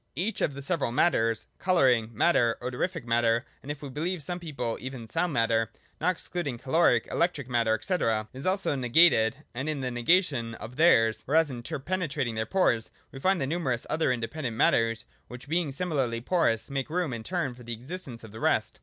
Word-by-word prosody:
Each 190 +10 -2
of 140 - 0
the 140 - -7
several 145 -5 -1
mat 170 +8 +4
ters 115 0 0
(colouring 130 -11 +3
matter, 115 -2 +3
odorific 130 +7 -3
matter, 115 0 +2 0.2
and 140 - -11
if 145 0 -7
we 140 - -5
beheve 165 +7 -2
some 175 +5 -3
people, 140 -9 -4
even 130 -3 -7
sound 165 +9 0
matter,— 115 -3 +1 0.3
not 170 - +2
excluding 165 -7 -4
caloric, 160 +8 +2
electric 150 -7 0
matter, 115 -3 +2
&c.) 185 - 0 0.4
is 135 +6 -5
also 190 -3 +1
negated: 130 -1 +4
and 130 +5 -3
in 150 -3 -2
this 130 -1 -2
nega 125 +11 +4
tion 115 -8 -4
of 120 +3 -9
theirs, 115 -9 +4
or 145 - +1
as 160 -3 +4
interpenetrating 140 +1 -3
their 110 0 -2
pores, 120 -11 +1 0.2
we 135 - -9
find 190 +5 +2
the 135 - 0
numerous 135 -5 -1
other 155 -4 +2
independent 120 0 -3
matters, 115 -1 +2 0.2
which, 125 +3 -10
being 165 -1 0
similarly 135 -7 -1
porous, 125 -4 +1
make 135 +1 -2
room 170 -4 -1
in 115 - -4
turn 165 0 -2
for 125 - -14
the 120 0 -6
existence 130 0 -7
of 110 - -11
the 110 - -9
rest. - - 0
135 Hz, 195 wpm, -28 LUFS, 115-165 Hz, 0.4 s, mat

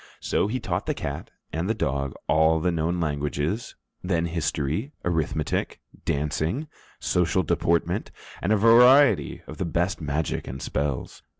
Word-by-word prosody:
So - - 0
he 125 +5 -2
taught - - -3
the - - 0
cat 70 +1 -5 0.2
and 85 +5 -1
the 110 - +1
dog 70 -7 -1
all 80 +1 +4
the 90 +2 +1
known 85 +2 -1
languages, 75 - -2 0.3
then 85 -2 0
history, 80 - -2
arithmetic, 80 -3 -1 0.3
dancing, 80 - -1 0.3
social 90 +1 +1
deportment, 85 +1 0 0.3
and 95 - 0
a 110 - +5
variety 120 - +6
of 75 - -10
the 95 - 0
best 85 +3 -1
magic 75 +1 -2
and 65 - -6
spells. 70 -1 -3
80 Hz, 140 wpm, -25 LUFS, 75-95 Hz, 0.3 s, variety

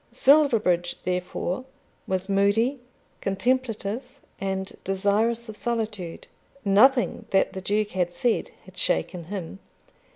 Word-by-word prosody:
Silverbridge, 225 - +3
therefore, 180 +3 -2 0.4
was 190 0 -1
moody, 205 +7 +2 0.4
contemplative, 225 +1 0 0.4
and 190 0 -3
desirous 210 +5 +1
of 220 - -7
solitude. 215 -7 -3 0.4
Nothing 230 +3 +4
that 195 0 +2
the 190 - -5
Duke 210 +2 0
had 180 -2 0
said 225 +7 0 0.2
had - - -15
shaken 175 -3 -1
him. 190 0 -6
200 Hz, 105 wpm, -25 LUFS, 190-230 Hz, 0.4 s, Nothing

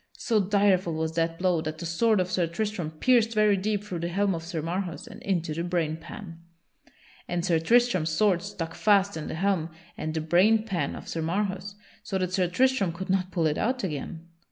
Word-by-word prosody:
So 225 -3 +1
direful 195 -3 +2
was 160 0 -2
that 165 0 0
blow 180 -2 +1
that 155 0 -4
the 170 - -6
sword 210 +6 +2
of 185 0 -1
Sir 175 -2 +1
Tristram 180 -1 -3
pierced 230 +7 +2
very 210 -1 +4
deep 205 +1 -1
through 185 -5 -5
the 170 - -2
helm 195 +3 +1
of 165 - -4
Sir 165 -2 -4
Marhaus 175 +1 -3
and - - -11
into 170 -5 -1
the 165 +2 -3
brainpan. 170 +1 -4 0.9
And 175 0 -2
Sir 170 -4 +2
Tristram's 230 -3 +3
sword 180 +2 +2
stuck 185 -5 -5
fast 200 0 +3
in 155 -1 -5
the - - -4
helm 180 -2 0 0.3
and 155 - -4
the 160 - 0
brain 190 +8 +4
pan 195 -6 -2
of - - -9
Sir 165 - -3
Marhaus 190 +3 -2 0.3
so 195 - -3
that 185 -1 -2
Sir 185 -1 +2
Tristram 250 0 +2
could 185 +3 -4
not 185 -1 +1
pull 170 -3 0
it 150 -1 +1
out 250 +3 0
again. 160 0 -5
180 Hz, 205 wpm, -27 LUFS, 165-205 Hz, 0.9 s, very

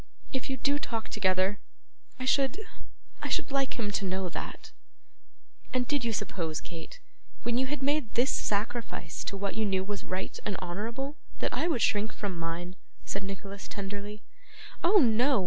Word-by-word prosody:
If 265 0 -1
you 265 - 0
do 280 +3 +2
talk 230 -7 -2
together, 190 0 +3 0.6
I 255 - -2
should 270 - +4 0.6
I - - -1
should - - +1
like 275 -1 +2
him 210 -4 0
to 200 - 0
know 190 -1 0
that.' - - -5 1.0
'And 250 -1 +3
did 285 -3 +2
you 230 - +2
suppose, 180 -7 -1
Kate, 175 - -8 0.4
when 240 +1 +2
you 260 - +2
had 290 0 -2
made 285 -4 +2
this 245 +4 +5
sacrifice 210 -5 -1
to 200 - -2
what 200 0 -1
you 220 - +1
knew 190 -2 +2
was 205 +1 -3
right 185 +1 -3
and 205 - 0
honourable, 230 - -3 0.2
that - - 0
I 335 - +2
should 290 -9 +3
shrink 215 -2 +3
from 200 -3 -2
mine?' 170 +2 -3 0.3
said 195 - -2
Nicholas 195 0 -5
tenderly. 205 +1 -4 0.6
'Oh 370 +5 +7
no! 250 - +6
210 Hz, 170 wpm, -31 LUFS, 195-260 Hz, 1.0 s, Oh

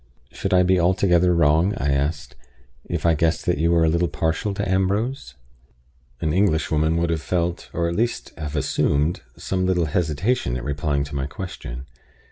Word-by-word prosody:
"Should 95 - -4
I 90 0 +5
be 90 0 +3
altogether 90 0 +3
wrong," 85 +4 +3
I 70 +1 0
asked, 70 -2 -2 0.5
"if - - -2
I 85 - +5
guessed 80 +1 0
that - - +1
you 85 +1 +2
were 85 -1 +3
a - - +3
little 85 +2 +2
partial 80 +7 -1
to - - -2
Ambrose?" 95 - -1 0.8
An 75 +1 -1
Englishwoman 80 -4 +1
would 85 0 0
have 80 -2 -1
felt, 85 0 -2
or 85 - -3
would 85 - +1
at 85 - -3
least 120 +2 -1
have 75 -2 -6
assumed, 75 +3 0 0.2
some 95 -1 -1
little 90 -2 +2
hesitation 80 - 0
at - - -6
replying 70 0 -1
to 70 0 -7
my 70 -1 -2
question. 65 -7 -7
85 Hz, 180 wpm, -22 LUFS, 75-90 Hz, 0.8 s, I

